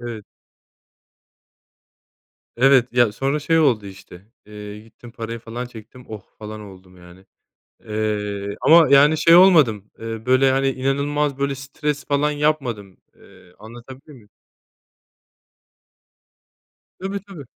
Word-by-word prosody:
Evet. 115 Hz, -3 st, -8 dB, 2.3 s
Evet, 130 Hz, -1 st, +4 dB
ya 120 Hz, -3 st, +3 dB
sonra 135 Hz, +7 st, -2 dB
şey 165 Hz, +3 st, +1 dB
oldu 125 Hz, -9 st, +1 dB
işte, 95 Hz, -1 st, -13 dB, 0.2 s
eee, 105 Hz, 0 st, -10 dB
gittim 115 Hz, +2 st, -16 dB
parayı 115 Hz, 0 st, -7 dB
falan 115 Hz, +2 st, -7 dB
çektim 120 Hz, +1 st, -14 dB
"oh 110 Hz, -2 st, -8 dB, 0.2 s
falan" 110 Hz, 0 st, -8 dB
oldum 95 Hz, -2 st, -15 dB
yani. 90 Hz, +2 st, -17 dB, 0.6 s
Eee, 105 Hz, -2 st, -3 dB
ama 160 Hz, -1 st, +6 dB
yani 145 Hz, +3 st, +5 dB
şey 165 Hz, +2 st, +5 dB
olmadım, 150 Hz, -, +4 dB
eee, 115 Hz, 0 st, -7 dB
böyle 130 Hz, +1 st, +3 dB
hani 135 Hz, 0 st, +1 dB
inanılmaz 140 Hz, +2 st, -2 dB
böyle 140 Hz, 0 st, -2 dB
stres 145 Hz, +2 st, -5 dB
falan 145 Hz, +1 st, 0 dB
yapmadım, 135 Hz, -10 st, -2 dB, 0.2 s
eee, 90 Hz, -, -21 dB
anlatabildim 125 Hz, +6 st, -13 dB
m? 105 Hz, -, -22 dB, 2.7 s
Tabii, 195 Hz, +2 st, -4 dB
tabii. 180 Hz, -8 st, -10 dB
120 Hz, 115 wpm, -20 LUFS, 105-140 Hz, 2.7 s, ama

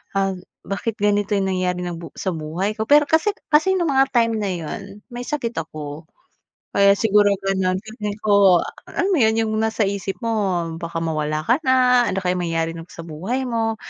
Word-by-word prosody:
ah, 195 Hz, 0 st, +2 dB, 0.3 s
bakit 200 Hz, +3 st, -3 dB
ganito 205 Hz, 0 st, +1 dB
yung 195 Hz, -1 st, 0 dB
nangyayari 180 Hz, -1 st, -1 dB
ng 175 Hz, -1 st, -4 dB
bu 165 Hz, -, -8 dB
sa 190 Hz, -, -2 dB
buhay 165 Hz, +5 st, -2 dB
ko. 220 Hz, -, -1 dB
Pero 295 Hz, +1 st, +6 dB
kasi 360 Hz, +6 st, +2 dB, 0.2 s
kasi 350 Hz, +6 st, +4 dB
nung 345 Hz, -4 st, 0 dB
mga 270 Hz, 0 st, +4 dB
time 230 Hz, -1 st, +3 dB
na 205 Hz, -, -1 dB
yun 195 Hz, +5 st, -7 dB
may 245 Hz, 0 st, -6 dB
sakit 255 Hz, -6 st, -2 dB
ako 155 Hz, 0 st, -7 dB, 0.7 s
kaya 200 Hz, 0 st, +6 dB
siguro 205 Hz, -1 st, +3 dB, 0.2 s
gano'n. 190 Hz, -1 st, +1 dB
Feeling 210 Hz, -2 st, -5 dB
ko 200 Hz, -4 st, +5 dB
a -, -, -7 dB, 0.3 s
alam 390 Hz, -, +2 dB
mo 355 Hz, -, +3 dB
yun 220 Hz, -2 st, +4 dB
yung 215 Hz, -, -2 dB
nasa 220 Hz, 0 st, +1 dB
isip 195 Hz, -1 st, -4 dB
mo 230 Hz, -, 0 dB, 0.5 s
baka 170 Hz, -1 st, -4 dB
mawala 155 Hz, -1 st, -1 dB
ka 240 Hz, -, +2 dB
na, 250 Hz, -2 st, +4 dB
ano 195 Hz, -, -1 dB
kayo 180 Hz, 0 st, +1 dB
mangyayari 165 Hz, -1 st, -1 dB
nung 165 Hz, +1 st, -9 dB
sa 165 Hz, -, -9 dB
buhay 190 Hz, +13 st, -3 dB
mo. 225 Hz, -2 st, -1 dB
200 Hz, 195 wpm, -21 LUFS, 175-230 Hz, 0.7 s, Pero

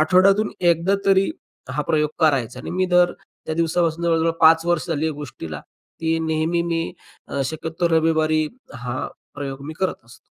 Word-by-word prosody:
आठवड्यातून 195 Hz, +6 st, +4 dB
एकदा 175 Hz, +2 st, +3 dB
तरी 195 Hz, 0 st, +4 dB, 0.4 s
हा -, -, -1 dB
प्रयोग 150 Hz, -2 st, +1 dB
करायचा 135 Hz, -7 st, +2 dB
आणि -, -, -6 dB
मी 185 Hz, +1 st, +1 dB
दर 180 Hz, -1 st, +4 dB
त्या 160 Hz, -, -9 dB
दिवसापासून 165 Hz, 0 st, 0 dB
जवळजवळ 165 Hz, -1 st, +2 dB
5 160 Hz, +1 st, +6 dB
वर्ष 175 Hz, -2 st, +1 dB
झाली 160 Hz, -1 st, 0 dB
या 160 Hz, -, 0 dB
गोष्टीला, 110 Hz, -, -7 dB, 0.4 s
की 165 Hz, 0 st, +1 dB
नेहमी 160 Hz, +1 st, 0 dB
मी 165 Hz, -1 st, -2 dB, 0.5 s
शक्यतो 160 Hz, +4 st, -2 dB
रविवारी 160 Hz, -1 st, +2 dB, 0.3 s
हा 125 Hz, +3 st, -4 dB, 0.3 s
प्रयोग 140 Hz, -1 st, -5 dB
मी 155 Hz, -, -5 dB
करत 190 Hz, -, +1 dB
असतो. 115 Hz, -, -16 dB
160 Hz, 155 wpm, -22 LUFS, 155-170 Hz, 0.5 s, 5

